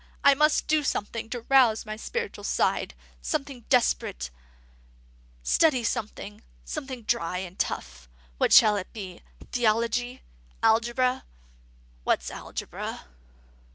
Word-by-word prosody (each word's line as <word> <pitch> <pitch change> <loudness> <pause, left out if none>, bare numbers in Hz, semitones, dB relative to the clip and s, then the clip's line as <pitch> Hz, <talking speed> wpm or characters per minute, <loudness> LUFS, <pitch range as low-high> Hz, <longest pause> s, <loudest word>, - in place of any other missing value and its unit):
I 280 - +8
must 300 +2 +3
do 305 -1 +2
something 225 -3 -2
to 245 0 -4
rouse 240 -3 +4
the 215 0 -5
spiritual 465 - -4
side; - - 0 0.3
something 275 -6 -3
desperate; 65 - +1 1.1
study 260 - +3
something, 210 -1 -4 0.2
something 265 -5 -5
dry 180 -6 0
and 185 0 -7
tough. 60 -1 -3 0.3
What - - +2
shall 215 -2 +7
it 185 - -5
be? 190 -5 -8 0.3
Theology? 240 +2 0 0.4
Algebra? 240 +3 +2 0.8
What's - - 0
Algebra?" - - -6
230 Hz, 110 wpm, -27 LUFS, 210-260 Hz, 1.1 s, I